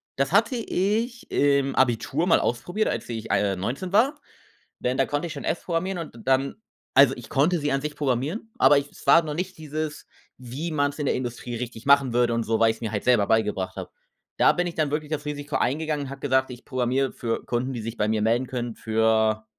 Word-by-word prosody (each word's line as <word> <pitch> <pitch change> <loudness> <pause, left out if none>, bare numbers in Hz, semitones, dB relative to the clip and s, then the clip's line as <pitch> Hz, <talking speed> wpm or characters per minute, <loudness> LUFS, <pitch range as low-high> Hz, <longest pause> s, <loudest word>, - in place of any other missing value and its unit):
Das 135 +1 0
hatte 230 +7 +3
ich 230 +2 -1
im 140 -1 +2
Abitur 130 +5 +1
mal 165 - +5
ausprobiert, 175 - -1
als - - -3
ich, 115 -2 -5
ah, - - +4
äh, 100 -1 +1
19 135 - -4
war, 270 +8 +3 0.6
denn 125 +1 0
da 135 - +3
konnte 145 +4 -2
ich 160 - -6
schon 140 - -7
S - - -1
programmieren 180 +2 -2
und 165 -8 -7
dann 135 +1 +1 0.4
also 135 0 +6
ich 120 -2 -10
konnte 160 +6 +2
sie 145 -2 -1
an 135 - +1
sich 150 +1 -5
programmieren, 145 - -2
aber 145 - +6
ich 140 0 -4
es - - -15
war 150 +4 +7
noch 155 -2 -4
nicht 180 +4 -4
dieses, 155 0 -5 0.3
wie 130 +7 -5
man's 145 -1 0
in 145 - -2
der - - +2
Industrie 120 -1 -4
richtig 120 0 -7
machen 140 -3 +5
würde 120 -1 +3
und 115 - 0
so, 110 0 0
weil 115 0 +5
ich's 110 - -5
mir 110 -2 -3
halt 105 - -3
selber 120 -5 +4
beigebracht 105 -4 0
habe. - - -6 0.5
Da - - +6
bin 180 - -1
ich 175 - -4
dann 155 -3 0
wirklich 150 0 -3
das 150 -2 -3
Risiko 145 0 -3
eingegangen 150 +1 -1
und - - -8
habe 140 0 -8
gesagt: 130 -1 +1
„Ich 125 0 -10
programmiere 130 0 0
für 115 -1 -3
Kunden, 125 +2 -1
die 120 - -4
sich 115 +1 -5
bei 105 - +1
mir 110 -1 +1
melden 115 +4 +2
können 120 -2 -4
für‟ 110 -1 +1
135 Hz, 230 wpm, -25 LUFS, 120-155 Hz, 0.6 s, war